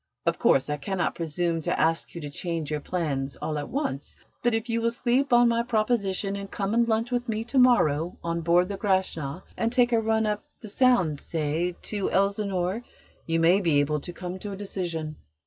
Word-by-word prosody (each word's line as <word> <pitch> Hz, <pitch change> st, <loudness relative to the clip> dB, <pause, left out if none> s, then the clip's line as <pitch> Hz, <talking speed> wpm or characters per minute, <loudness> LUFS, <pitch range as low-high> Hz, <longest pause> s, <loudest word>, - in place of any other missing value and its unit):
Of -, -, +1 dB
course, 135 Hz, -, +3 dB
I 150 Hz, -, -1 dB
cannot 185 Hz, +5 st, -1 dB
presume 165 Hz, 0 st, -1 dB
to -, -, -1 dB
ask 165 Hz, +2 st, +1 dB
you 170 Hz, -, -5 dB
to 145 Hz, -, -5 dB
change 165 Hz, -1 st, -3 dB
your 150 Hz, -, -1 dB
plans 145 Hz, -5 st, -2 dB
all 150 Hz, -1 st, -3 dB
at 145 Hz, -, -6 dB
once, 265 Hz, -, -3 dB, 0.3 s
but 240 Hz, -1 st, +2 dB
if 225 Hz, +1 st, -2 dB
you 230 Hz, -1 st, 0 dB
will 230 Hz, -, +2 dB
sleep 245 Hz, +3 st, 0 dB
on 240 Hz, 0 st, +6 dB
my 235 Hz, 0 st, +2 dB
proposition 215 Hz, -4 st, 0 dB
and 200 Hz, 0 st, -6 dB
come 200 Hz, +1 st, -2 dB
and 235 Hz, 0 st, +3 dB
lunch 225 Hz, +2 st, 0 dB
with 245 Hz, 0 st, -1 dB
me 220 Hz, 0 st, -1 dB
to 260 Hz, +3 st, 0 dB
morrow 175 Hz, -, +3 dB
on 170 Hz, 0 st, -1 dB
board 175 Hz, +3 st, +3 dB
the 200 Hz, -, -4 dB
Grashna 185 Hz, -6 st, -1 dB
and 230 Hz, 0 st, 0 dB
take 245 Hz, -1 st, +3 dB
a 230 Hz, -, +4 dB
run 220 Hz, 0 st, +1 dB
up 210 Hz, -1 st, -1 dB, 0.2 s
the 215 Hz, -, -9 dB
Sound, 200 Hz, -, +3 dB
say, 165 Hz, +2 st, -1 dB
to 205 Hz, -2 st, -2 dB
Elsinore, 195 Hz, +1 st, 0 dB, 0.4 s
you 165 Hz, 0 st, +1 dB
may 175 Hz, +4 st, +4 dB
be 160 Hz, -6 st, +3 dB
able 150 Hz, +1 st, +1 dB
to 175 Hz, -, -7 dB
come 180 Hz, +1 st, -6 dB
to 205 Hz, +1 st, -5 dB
a -, -, -7 dB
decision." 170 Hz, -6 st, -4 dB
190 Hz, 210 wpm, -26 LUFS, 165-225 Hz, 0.4 s, on